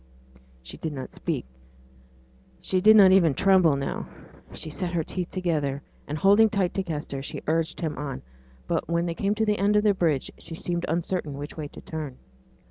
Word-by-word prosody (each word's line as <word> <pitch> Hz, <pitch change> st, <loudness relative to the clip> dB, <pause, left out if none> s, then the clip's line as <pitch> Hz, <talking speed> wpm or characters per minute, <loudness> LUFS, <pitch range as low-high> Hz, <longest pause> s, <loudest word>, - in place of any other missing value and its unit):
She 65 Hz, -, -9 dB
did 160 Hz, -2 st, -4 dB
not 130 Hz, -2 st, -7 dB
speak; -, -, -3 dB, 1.1 s
she 185 Hz, -1 st, 0 dB
did 215 Hz, +3 st, +7 dB
not 195 Hz, -3 st, +8 dB
even 170 Hz, -7 st, +5 dB
tremble 185 Hz, -6 st, +4 dB
now; 140 Hz, 0 st, -3 dB, 0.4 s
she 155 Hz, -, -6 dB
set 175 Hz, +2 st, -3 dB
her 165 Hz, -2 st, +1 dB
teeth 180 Hz, +2 st, -4 dB
together, 150 Hz, -7 st, -1 dB, 0.2 s
and, 150 Hz, -, -3 dB
holding 205 Hz, +6 st, +5 dB
tight 195 Hz, -4 st, 0 dB
by 195 Hz, -, 0 dB
Kester, 150 Hz, -6 st, -4 dB
she 135 Hz, -, -6 dB
urged 160 Hz, +2 st, -1 dB
him 155 Hz, -3 st, -2 dB
on; 140 Hz, -3 st, -5 dB, 0.4 s
but -, -, -1 dB
when 170 Hz, 0 st, +1 dB
they 170 Hz, -, -2 dB
came 200 Hz, +5 st, 0 dB
to 220 Hz, 0 st, +1 dB
the 210 Hz, -1 st, +1 dB
end 205 Hz, +2 st, +3 dB
of 210 Hz, -, +4 dB
the 210 Hz, -1 st, +4 dB
bridge, 160 Hz, -8 st, 0 dB
she 165 Hz, -, -7 dB
seemed 175 Hz, +1 st, -2 dB
uncertain 165 Hz, -3 st, -2 dB
which 145 Hz, +1 st, -7 dB
way 155 Hz, -2 st, -5 dB
to -, -, -12 dB
turn. 150 Hz, -5 st, -6 dB
170 Hz, 195 wpm, -26 LUFS, 150-190 Hz, 1.1 s, not